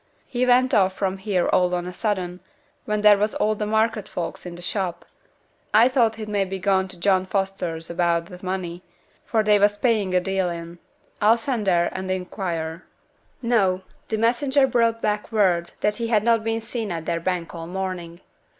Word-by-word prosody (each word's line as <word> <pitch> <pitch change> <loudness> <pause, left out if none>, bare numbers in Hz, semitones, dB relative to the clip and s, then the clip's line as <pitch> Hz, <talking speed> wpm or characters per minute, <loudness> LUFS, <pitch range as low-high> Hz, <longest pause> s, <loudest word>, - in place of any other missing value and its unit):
'He 250 0 -1
went 255 +2 +4
off 190 -2 +4
from 190 0 -2
here 190 -3 0
all 180 0 +3
on 175 0 -3
a 180 - -6
sudden, 180 -3 -2 0.4
when 210 -3 -1
there 210 -1 +6
was 210 +1 0
all 215 - +1
the 210 0 -3
market 220 -1 +1
folks 175 +1 -5
in 175 - -7
t' 175 - -10
shop; 185 -2 -3 0.7
I 230 +4 +7
thought 235 -4 +2
he'd 220 -1 -7
maybe 195 -2 -1
gone 190 0 +1
to 185 - -10
John 190 0 +2
Foster's 185 -4 -2
about 170 -1 +1
th' 180 +1 -12
money, 185 -2 -4 0.5
for 220 -2 +2
they 210 -1 +4
was 205 +1 +3
paying 205 -5 +1
a - - +5
deal 190 0 -1
in. 170 0 -7 0.4
I'll 220 +3 +5
send 230 -3 -2
there 175 -2 +3
and 190 0 -5
inquire.' 180 -3 -3 0.6
No! 195 -6 +2 0.2
the 220 - -1
messenger 265 +5 +3
brought 230 -3 +1
back 210 +1 -1
word 185 -6 +2
that 210 0 +1
he 230 -1 -2
had 215 -3 +2
not 230 -1 +3
been 225 0 -1
seen 225 -2 -4
at 165 -2 -4
their 170 0 -1
bank 175 -1 -2
all 165 -1 -7
morning. 180 -2 -5
195 Hz, 190 wpm, -23 LUFS, 180-220 Hz, 0.7 s, I